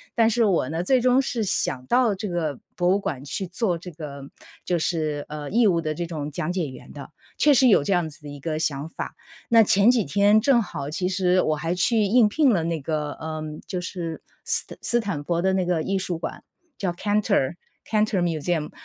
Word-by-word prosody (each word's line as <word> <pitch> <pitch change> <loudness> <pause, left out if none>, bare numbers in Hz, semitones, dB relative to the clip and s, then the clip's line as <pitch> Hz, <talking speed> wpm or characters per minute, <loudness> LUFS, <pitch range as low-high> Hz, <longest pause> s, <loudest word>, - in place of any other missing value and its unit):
但 225 -1 +4
是 230 0 +2
我 175 -10 +1
呢， 165 +2 -2
最 255 +7 +3
终 250 +2 +4
是 240 -4 -2
想 130 -9 -1
到 245 -4 +3
这 205 +1 -5
个 160 -6 -2 0.2
博 175 0 +1
物 190 - +4
馆 140 -8 -4
去 190 +6 -3
做 180 -1 -1
这 180 +2 -9
个 145 -4 -8 0.4
就 175 -1 0
是， 155 -3 -1
呃， 150 -1 -6
义 230 +2 +4
务 170 -4 +2
的 155 -1 -2
这 175 +2 -3
种 150 -3 -5
讲 170 +3 -2
解 180 -4 -1
员 130 - -12
的， 140 -2 -9 0.3
确 295 - +5
实 260 -1 +5
有 205 -11 +5
这 195 - +1
样 175 -3 +1
子 155 - -15
的 150 - -9
一 145 0 -9
个 155 +2 -3
想 145 -2 -2
法。 - - -5 0.5
那 230 -1 +7
前 205 +2 +5
几 235 -5 +1
天 205 +8 +4
正 240 +1 +4
好 145 -9 -5
其 180 +4 -2
实 185 -1 +2
我 155 - +1
还 165 +3 -2
去 215 +5 +2
应 215 +2 +4
聘 290 +4 +3
了 175 -7 +1
那 165 -1 -1
个， 150 0 -2
呃， 155 0 -6 0.3
就 180 -1 -3
是 170 -2 -5 0.2
斯 - - +1 0.2
斯 240 - +1
坦 200 -9 -3
佛 170 +2 -1
的 190 +1 +2
那 190 -1 +1
个 175 -3 0
艺 195 +3 0
术 180 -2 -2
馆， 165 - -6 0.3
叫 190 -3 -1
Cantor 200 -6 +1 0.3
Cantor 215 -3 +1
Museum， 165 -1 -1
175 Hz, 285 characters per minute, -24 LUFS, 155-210 Hz, 0.5 s, 那